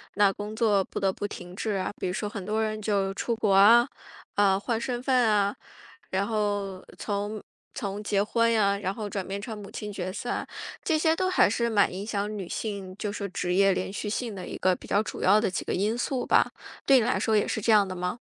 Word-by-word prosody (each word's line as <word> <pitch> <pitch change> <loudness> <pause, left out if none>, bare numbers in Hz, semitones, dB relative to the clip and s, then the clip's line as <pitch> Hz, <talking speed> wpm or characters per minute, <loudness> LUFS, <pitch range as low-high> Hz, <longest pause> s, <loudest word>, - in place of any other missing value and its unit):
那 200 -1 +5
工 210 +2 -6
作 210 -4 +3
不 - - -6
得 195 -1 +2
不 205 - -4
停 180 -2 -9
滞 215 +2 -2
啊。 195 -2 -1
比 - - -2
如 180 - -2
说 210 +2 -2
很 200 -2 -6
多 215 +2 0
人 215 0 -2
就 200 -2 +1
是 195 - -4
出 235 +3 -1
国 215 -3 +1
啊， 225 +5 +7 0.5
啊， 195 -2 +4
换 225 +1 -1
身 240 +1 -3
份 265 - +1
啊， 205 -1 +2 0.6
然 195 +1 0
后 205 -3 -1
从 205 +1 -3 0.3
从 200 0 -4
结 200 -1 +1
婚 230 +2 +2
呀， 200 -3 +3
然 195 -1 -2
后 210 -1 -5
转 195 -2 -4
变 200 +1 -4
成 220 +1 -6
母 200 -1 -9
亲 210 -1 -6
角 185 -2 -4
色 - - -5
啊， - - -2 0.4
这 320 - +2
些 320 +1 +3
都 370 +2 0
还 370 - +4
是 235 +2 0
蛮 205 -3 +3
影 195 +2 -5
响 210 0 -2
女 190 -3 -5
性， 195 -2 -5
就 210 -1 -3
是 205 -1 -4
职 180 -1 -2
业 195 0 +5
连 185 - -3
续 210 +1 -4
性 225 +1 -2
的 185 - -7
一 - - -6
个 185 -1 +2
比 - - -13
较 205 +2 +2
主 - - -6
要 205 +3 +5
的 215 - 0
几 - - -3
个 - - -2
因 210 +5 0
素 250 +1 -1
吧， - - +3 0.3
对 270 -1 +6
你 - - +1
来 - - +1
说 220 - +1
也 210 - +3
是 - - -1
这 220 +2 +2
样 205 -2 +6
的 185 - -5
吗？ 180 +5 -3
205 Hz, 270 characters per minute, -27 LUFS, 195-220 Hz, 0.6 s, 啊